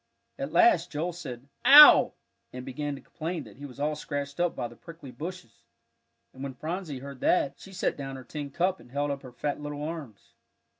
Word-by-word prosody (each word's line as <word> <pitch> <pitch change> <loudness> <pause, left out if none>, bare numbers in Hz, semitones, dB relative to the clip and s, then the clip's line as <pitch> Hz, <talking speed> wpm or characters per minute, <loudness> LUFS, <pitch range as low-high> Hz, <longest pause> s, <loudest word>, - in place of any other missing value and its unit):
At - - -4
last 350 -2 +4
Joel 165 +4 -2
said, 135 -7 -8 0.2
"Ow!" 290 +3 +10 0.4
and 125 0 -8
began 145 +2 -4
to 135 - -11
complain 165 +2 -5
that - - -15
he 145 +1 -8
was 130 0 -14
all 150 +1 0
scratched 145 0 -5
up 175 -1 +1
by 125 -2 -3
the 120 - -14
prickly 165 -1 -12
bushes, 150 -3 -9 0.7
and 130 - -12
when 135 -2 -5
Phronsie 160 0 -5
heard 140 0 -9
that, 140 -3 +1
she 195 - -12
set 180 - -1
down 135 -1 -6
her 130 - -9
tin 145 +3 -6
cup 180 +6 0
and - - -17
held 145 +1 -1
up 140 -1 -4
her 130 - -11
fat 145 +4 -3
little 145 0 -5
arms. 150 -10 -7
145 Hz, 205 wpm, -28 LUFS, 135-170 Hz, 0.7 s, Ow